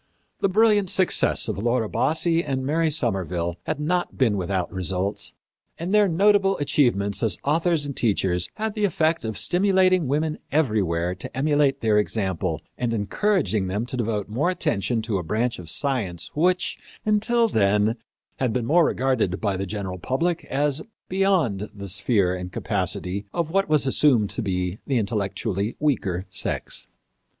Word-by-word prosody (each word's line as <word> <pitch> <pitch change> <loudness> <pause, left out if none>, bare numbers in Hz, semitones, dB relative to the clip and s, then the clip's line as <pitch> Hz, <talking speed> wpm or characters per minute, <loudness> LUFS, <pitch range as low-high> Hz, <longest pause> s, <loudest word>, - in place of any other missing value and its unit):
The 195 - +2
brilliant 210 -1 +3
success 185 0 +2
of - - -3
Laura 120 0 0
Bassi 165 +7 +1
and 130 -2 -2
Mary 160 +3 +1
Somerville 90 - -1
had - - -2
not 175 +4 -1
been 115 -6 +2
without 95 -1 -2
results, 95 +2 -1 0.5
and 175 +4 -3
their 210 -1 +5
notable 195 +2 +3
achievements 100 -9 +1
as 115 - +1
authors 160 +1 +1
and 140 -2 -5
teachers 95 -6 +1
had 220 0 -2
the 210 - -3
effect 165 -3 +1
of 110 -2 -4
stimulating 185 -3 +3
women 155 +3 -1
everywhere 95 - +1
to 95 +7 -8
emulate 145 -1 +2
their 110 -2 +3
example, 95 -4 -1 0.2
and 120 -2 0
encouraging 110 - 0
them 100 +5 -2
to 125 - -6
devote 110 -4 -2
more 125 - 0
attention 120 - -1
to 110 -4 -1
a - - -4
branch 115 +7 -1
of 85 -3 -9
science 100 - -2
which, 180 +4 +1 0.3
until 225 +2 +2
then, 105 - +2 0.4
had 130 -3 0
been 120 -1 -1
regarded 130 - +2
by 100 -3 0
the 95 +1 -3
general 95 -2 -5
public 165 - -1
as 145 +2 0 0.3
beyond 175 - +1
the 100 -1 -7
sphere 100 0 +2
and 90 0 -6
capacity 100 +3 -2
of 165 -2 -1
what 195 0 +1
was 150 -3 +3
assumed 130 -6 +3
to - - -3
be 90 -1 -2
the 135 - +1
intellectually 105 -1 -2
weaker 100 -11 0
sex. 95 0 -1
120 Hz, 155 wpm, -24 LUFS, 100-160 Hz, 0.5 s, their